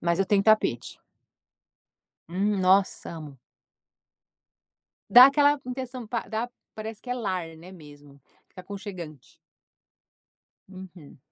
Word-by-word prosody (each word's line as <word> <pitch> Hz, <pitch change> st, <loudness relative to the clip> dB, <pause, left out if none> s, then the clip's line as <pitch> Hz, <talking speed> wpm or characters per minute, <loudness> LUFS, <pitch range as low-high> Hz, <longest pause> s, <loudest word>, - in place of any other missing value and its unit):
mas 170 Hz, +1 st, 0 dB
eu 195 Hz, -, +1 dB
tenho 200 Hz, -1 st, +2 dB
tapete. 215 Hz, -, +1 dB, 1.3 s
Hum, 200 Hz, +4 st, -1 dB
nossa, 190 Hz, +1 st, +2 dB
amo. 150 Hz, -5 st, -10 dB, 1.7 s
Dá 245 Hz, +4 st, +10 dB
aquela 290 Hz, +1 st, +3 dB
intenção 255 Hz, -1 st, -6 dB
pa 230 Hz, +1 st, -4 dB
dá 230 Hz, +2 st, -3 dB, 0.2 s
parece 220 Hz, 0 st, -7 dB
que 250 Hz, -, -14 dB
é 250 Hz, -, -1 dB
lar, 185 Hz, -8 st, -4 dB
né, 180 Hz, +4 st, -13 dB
mesmo 145 Hz, -4 st, -16 dB, 0.3 s
fica 185 Hz, -, -13 dB
aconchegante. 185 Hz, -, -9 dB, 1.3 s
Uhum. 185 Hz, -7 st, -13 dB
195 Hz, 110 wpm, -26 LUFS, 170-225 Hz, 1.7 s, Dá